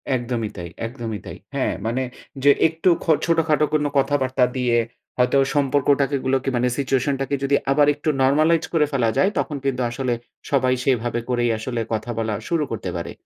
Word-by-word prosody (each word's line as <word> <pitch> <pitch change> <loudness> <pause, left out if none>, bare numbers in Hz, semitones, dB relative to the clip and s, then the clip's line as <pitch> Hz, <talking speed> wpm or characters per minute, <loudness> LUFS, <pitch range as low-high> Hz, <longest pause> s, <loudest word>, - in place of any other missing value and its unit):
একদমই 120 -3 -2
তাই, 85 -1 -6 0.2
একদমই 115 -3 -5
তাই। - - -8 0.2
হ্যাঁ, - - 0
মানে 120 +3 0 0.4
যে 145 - +7 0.2
একটু 165 +3 0
খো 165 - +2
ছোটখাটো 160 -2 +2
কোনো 150 -1 +2
কথাবার্তা 135 -2 +2
দিয়ে 125 -2 +2 0.4
হয়তো 125 +2 +3 0.2
সম্পর্কটাকে 140 0 +2
গুলোকে 135 0 +1
মানে 120 +1 +2
সিচুয়েশন 135 0 +1
টাকে 135 +1 0
যদি 140 +1 +2 0.2
আবার 145 +1 +4
একটু 145 +2 -2
নরমালাইজ 155 +5 +3
করে 155 -3 +4
ফেলা 125 -5 +1
যায়, 190 - +4
তখন 150 - -2
কিন্তু 130 -2 0
আসলে 125 0 -1 0.4
সবাই 130 -2 +3
সেভাবে 120 -3 +1
করেই 120 -1 +1
আসলে 115 +1 -3
কথা 110 +2 -2
বলা 110 -1 -1 0.2
শুরু 165 -3 +1
করতে 105 -4 -4
পারে। 85 - -5
130 Hz, 170 wpm, -22 LUFS, 120-145 Hz, 0.4 s, যে